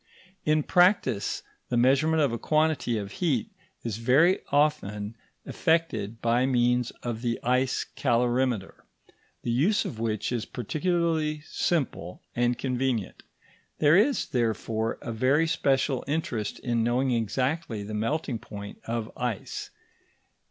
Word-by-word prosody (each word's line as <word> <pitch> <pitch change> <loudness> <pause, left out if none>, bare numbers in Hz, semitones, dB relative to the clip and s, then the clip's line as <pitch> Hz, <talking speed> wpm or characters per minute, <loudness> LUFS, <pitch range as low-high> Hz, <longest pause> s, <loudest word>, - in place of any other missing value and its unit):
In 155 0 +3
practice, 180 - +2 0.3
the 120 - +1
measurement 140 +6 +4
of 140 - +2
a 115 - -3
quantity 155 -6 +1
of 100 -2 -5
heat 175 +4 -1 0.3
is 115 -3 -3
very 145 - +4
often 115 -8 +1 0.3
effected 115 -10 0
by 120 +2 +3
means 125 -1 +2
of 115 -2 -3
the 120 -1 -1
ice 125 +1 +1
calorimeter, 120 -3 0 0.6
the 120 - -1
use 165 - +2
of 110 - -5
which 110 -1 -1
is 120 -3 -1
particularly 160 +1 -1
simple 135 - -2 0.2
and 120 0 +1
convenient. 125 -5 -2 0.6
There 150 +1 +5
is, 240 +8 +3
therefore, 115 -2 -1
a - - -4
very 130 +8 +2
special 135 -4 +1
interest 140 -8 -2
in 120 -2 0
knowing 125 +3 +1
exactly 120 +1 -1
the 105 +1 -7
melting 115 +3 -1
point 100 -3 -9
of 115 -1 -3
ice. 120 -5 -4
125 Hz, 125 wpm, -27 LUFS, 115-150 Hz, 0.6 s, There